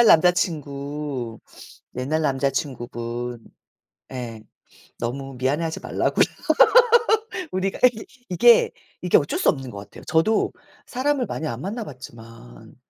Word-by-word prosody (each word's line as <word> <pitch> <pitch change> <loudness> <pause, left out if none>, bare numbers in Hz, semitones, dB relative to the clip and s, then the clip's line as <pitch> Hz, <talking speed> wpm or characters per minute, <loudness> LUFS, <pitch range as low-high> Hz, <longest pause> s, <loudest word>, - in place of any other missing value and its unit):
옛날 235 - +6
남자친구. 145 - +1 0.6
옛날 150 +5 0
남자친구분. 120 -4 -2 0.7
예 120 -4 -6 0.6
너무 135 +3 -4
미안해하지 150 +6 -1
말라고요. - - +1 1.3
우리가 190 +1 -2
예. 230 -3 +1 0.2
이게 235 +7 +5 0.3
이게 180 - +4
어쩔 145 - -1
수 - - +4
없는 135 -3 -2
것 - - -9
같아요. 100 0 -12
저도 185 +7 +2 0.3
사람을 265 0 0
많이 155 - -4
안 120 -3 -5
만나봤지만 120 - -9
140 Hz, 255 characters per minute, -23 LUFS, 120-175 Hz, 1.3 s, 옛날